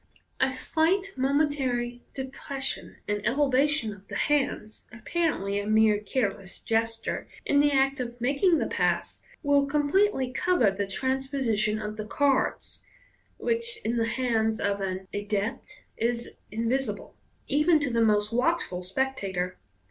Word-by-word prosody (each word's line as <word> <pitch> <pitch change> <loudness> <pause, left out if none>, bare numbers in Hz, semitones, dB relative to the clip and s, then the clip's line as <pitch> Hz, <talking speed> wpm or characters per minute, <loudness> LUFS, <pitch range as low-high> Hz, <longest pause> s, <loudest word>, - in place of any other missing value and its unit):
A 260 0 +3
slight 340 +9 +1
momentary 265 -3 0
depression 270 +1 -5
and 205 0 -1
ele 270 +5 +2
vation 265 -5 +2
of 200 0 -19
the - - -7
hands 275 -7 0
(apparently 235 - -1
a 205 - -4
mere 215 -1 +4
careless 205 -3 -2
gesture) 225 0 -1 0.2
in 285 - +3
the 290 0 +4
act 270 0 +2
of 240 -1 -5
making 285 +8 +3
the - - 0
pass - - -1 0.2
will 285 -1 +3
completely 290 -1 +2
cover 300 - +3
the 200 +1 -2
transposition 260 -3 0
of 210 0 -5
the 215 - -4
cards, 275 +5 0 0.6
which 465 -1 -1
in 235 +1 0
the 230 0 +1
hands 225 -3 0
of 200 0 0
an 190 0 -3
adept 205 +1 -3 0.2
is 235 +1 -1 0.2
invisible, 230 +5 -2 0.3
even 300 +3 +4
to 285 -3 -1
the 230 0 +2
most 210 0 +2
watch 330 +8 +2
ful 180 0 -6
spectator. 190 -4 -2
245 Hz, 140 wpm, -27 LUFS, 215-285 Hz, 0.6 s, mere